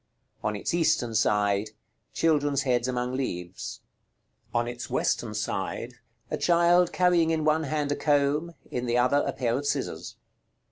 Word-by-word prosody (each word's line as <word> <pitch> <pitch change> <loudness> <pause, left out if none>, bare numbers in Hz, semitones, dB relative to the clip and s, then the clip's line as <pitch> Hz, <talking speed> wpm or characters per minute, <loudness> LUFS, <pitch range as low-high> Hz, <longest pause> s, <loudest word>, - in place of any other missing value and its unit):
On 105 - -1
its 100 - -3
eastern 155 -8 +1
side. 105 -1 +2 0.4
Children's 145 -4 +1
heads 125 -2 +1
among 125 0 -2
leaves. 90 -9 -4 0.7
On 120 0 0
its 120 0 -6
western - - -1
side. - - -3 0.4
A - - 0
child 175 0 +4
carrying 175 -3 +3
in 160 -1 0
one 155 +1 +2
hand 145 0 -1
a - - +1
comb; 150 +3 +1 0.2
in 125 0 -2
the 120 +1 +1
other, 125 +3 +3
a - - 0
pair 120 -3 -1
of 145 - -4
scissors. - - -3
140 Hz, 150 wpm, -27 LUFS, 120-160 Hz, 0.7 s, child